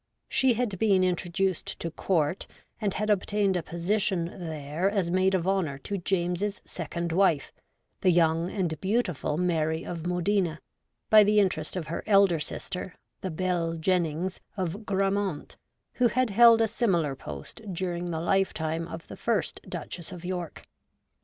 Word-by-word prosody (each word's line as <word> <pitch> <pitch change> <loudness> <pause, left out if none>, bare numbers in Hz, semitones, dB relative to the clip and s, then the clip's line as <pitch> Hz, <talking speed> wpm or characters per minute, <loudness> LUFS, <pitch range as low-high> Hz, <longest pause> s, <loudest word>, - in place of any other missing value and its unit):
She 260 -3 +3
had 215 -6 -2
been 195 -4 +4
introduced 180 0 -1
to 165 - -4
Court, 165 0 0 0.3
and 205 -3 0
had 210 +1 0
obtained 200 -1 +1
a 175 - +1
position 180 +2 0
there 160 +1 -2
as 195 -4 0
maid 190 +1 +3
of 180 -1 -1
honour 185 -8 0
to 200 +8 -4
James's 180 +2 -1
second 170 0 -4
wife, 165 -4 +2 0.5
the 185 - +3
young 165 0 +3
and 175 -7 -2
beautiful 190 - 0
Mary 160 -2 0
of 170 -1 -5
Modena, 180 -2 0 0.5
by 215 -1 +9
the 210 +1 +4
interest 180 -6 0
of 180 -4 -3
her 160 +3 -4
elder 195 -5 +5
sister, 180 +4 -5 0.3
the 190 - -3
'Belle 170 -1 -1
Jennings 175 +1 0
' - - -36
of 190 +4 -3
Grammont, 195 -4 -1 0.4
who 250 - +3
had 250 0 +1
held 230 +1 +7
a 225 - +4
similar 175 - +1
post 225 - -9
during 175 -1 -3
the 160 -2 -2
lifetime 165 -2 0
of 165 -1 -8
the - - -8
first - - -1
Duchess 175 -1 -6
of 180 -1 -8
York. 180 -2 -4
180 Hz, 155 wpm, -28 LUFS, 165-195 Hz, 0.5 s, by